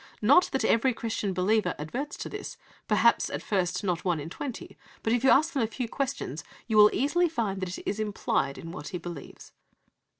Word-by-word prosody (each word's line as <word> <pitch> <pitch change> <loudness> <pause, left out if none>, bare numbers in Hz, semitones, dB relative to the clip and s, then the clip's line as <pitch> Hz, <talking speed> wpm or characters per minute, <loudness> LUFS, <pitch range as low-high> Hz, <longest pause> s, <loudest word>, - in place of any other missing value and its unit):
"Not 285 +11 +6
that 265 - 0
every 240 +2 +3
Christian 220 -4 -2
believer 185 +1 +1
adverts 250 - -5
to - - -5
this; - - -7 0.3
perhaps, - - +3
at - - -5
first, 185 -1 -1
not 180 -3 -1
one 175 -4 0
in 155 +3 -7
twenty; 265 +1 -6 0.3
but, 225 - +1
if 245 0 +1
you 265 - +5
ask 305 +3 +4
them 275 - 0
a 225 - +2
few 240 +2 -4
questions, 235 - -3 0.2
you 220 - -2
will 210 0 +8
easily 345 +6 +2
find 215 -10 -2
it 185 -1 -3
is 205 - -2
implied 200 -9 -1
in 165 - -8
what 160 -4 -7
he 180 - -4
believes." 170 -4 -9
215 Hz, 200 wpm, -28 LUFS, 180-255 Hz, 0.3 s, will